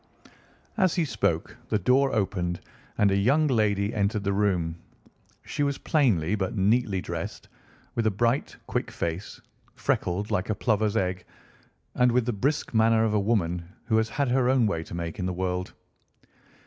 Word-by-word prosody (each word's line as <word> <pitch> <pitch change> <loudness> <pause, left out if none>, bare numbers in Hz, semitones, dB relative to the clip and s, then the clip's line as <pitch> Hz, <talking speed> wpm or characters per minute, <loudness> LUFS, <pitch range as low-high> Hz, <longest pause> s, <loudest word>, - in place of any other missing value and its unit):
As 185 -5 +3
he 170 -3 +1
spoke 100 - -1
the - - +2
door 130 +7 +3
opened 90 -5 -1 0.4
and 100 -1 +4
a - - +2
young 135 +11 +3
lady 105 -6 +1
entered 105 0 0
the 100 -1 0
room. 90 -5 +1 0.7
She - - -4
was 140 -1 +1
plainly 105 - +2
but 100 0 -2
neatly 100 0 +2
dressed, - - -6 0.5
with 115 -2 0
a - - +5
bright, 115 +6 0
quick - - -2
face, 85 +4 -4 0.4
freckled 100 +4 -1
like 90 +3 0
a 110 - +1
plover's 110 -1 +1
egg, 90 -2 -1 0.7
and 125 0 +3
with 125 -1 +2
the 120 - 0
brisk 140 +9 -1
manner 110 0 +4
of 110 - 0
a 105 - +3
woman 90 -5 0 0.2
who 110 -2 +2
has 110 0 +1
had 140 +2 0
her 125 0 +2
own 130 -3 +4
way 85 -6 -1
to - - -8
make 85 +3 -5
in 90 - -1
the 90 - -2
world. 90 0 -2
105 Hz, 175 wpm, -26 LUFS, 95-120 Hz, 0.7 s, a